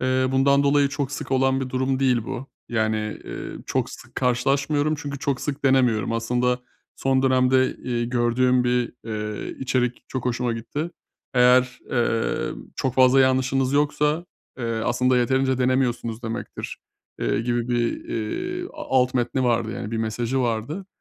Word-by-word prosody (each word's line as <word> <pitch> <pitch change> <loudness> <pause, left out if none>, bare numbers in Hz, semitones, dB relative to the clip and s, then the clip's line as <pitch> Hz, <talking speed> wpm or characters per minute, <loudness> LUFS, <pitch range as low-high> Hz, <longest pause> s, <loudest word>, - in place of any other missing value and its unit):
Eee, 130 0 +2
bundan 140 +1 +4
dolayı 140 0 +3
çok 140 -1 -3
sık - - -5
olan 135 0 +2
bir 130 - -3
durum 130 +1 0
değil 125 -4 +2
bu. 135 +1 -5 0.2
Yani, 110 -2 +1 0.3
eee, - - -6 0.2
çok - - -1
sık - - -12
karşılaşmıyorum 140 +4 +1
çünkü 145 -2 -5
çok 140 -2 -1
sık 145 -1 -4
denemiyorum. 125 -6 +3
Aslında 125 +2 +1 0.4
son 130 0 +1
dönemde, 130 0 +3
eee, 120 -2 -2
gördüğüm 125 +1 +2
bir, 125 -1 +1
eee, 105 -1 -4
içerik 125 -2 -1
çok 130 -2 -4
hoşuma 125 -1 0
gitti. 145 +9 -4 0.4
Eğer, 125 0 +4
eee, 115 -2 0 0.2
çok 130 -2 -1
fazla 130 +1 +6
yanlışınız 130 0 +2
yoksa, 150 +3 +1 0.3
eee, 120 - -3 0.2
aslında 125 +1 +2
yeterince 130 +1 +2
denemiyorsunuz 125 -3 0
demektir, 115 0 -5 0.4
eee, - - +1
gibi 120 0 -1
bir, 120 -1 0
eee, 360 - -3
a - - -7 0.2
alt 125 +1 0
metni 125 +1 0
vardı, 115 -2 +1
yani 105 - -5
bir 115 - -2
mesajı 115 +4 -1
vardı. 120 - -2
125 Hz, 150 wpm, -24 LUFS, 120-135 Hz, 0.4 s, fazla